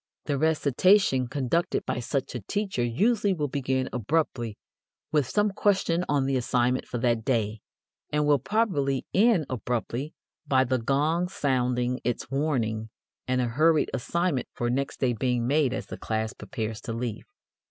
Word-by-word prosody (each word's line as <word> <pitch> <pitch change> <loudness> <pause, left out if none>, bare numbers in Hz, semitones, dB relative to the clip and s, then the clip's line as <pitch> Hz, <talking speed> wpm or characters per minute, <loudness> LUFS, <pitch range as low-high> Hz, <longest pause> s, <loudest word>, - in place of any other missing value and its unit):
The 140 -2 -1
recitation 155 -1 +3
conducted 145 +7 0
by - - -2
such 135 +2 -2
a 125 - -3
teacher 195 - -2
usually 200 - +2
will 150 -3 -1
begin 130 -1 -1
abruptly 125 -3 -1 0.5
with 145 -5 +2
some 210 0 +2
question 190 -3 +1
on 140 -2 +2
the 135 -1 +1
assignment 125 0 +1
for 120 - -4
that 115 -1 +1
day 110 -4 0 0.5
and 150 0 +1
will 145 -1 +4
probably 145 - 0
end 205 -6 +4
abruptly 125 +3 -3 0.3
by 130 -2 +4
the 130 0 0
gong 150 +8 +1
sounding 125 -5 0
its 125 +1 -2
warning 115 -7 -1 0.4
and 130 0 +1
a - - +1
hurried 155 +6 +3
assignment 145 +2 -1
for 120 0 -1
next 135 +2 -2
day 125 -2 +2
being 120 +1 0
made 140 0 +2
as 135 - -3
the - - -8
class 110 0 -2
prepares 110 -4 -5
to 115 - -5
leave. 115 -1 -4
130 Hz, 155 wpm, -27 LUFS, 120-155 Hz, 0.5 s, will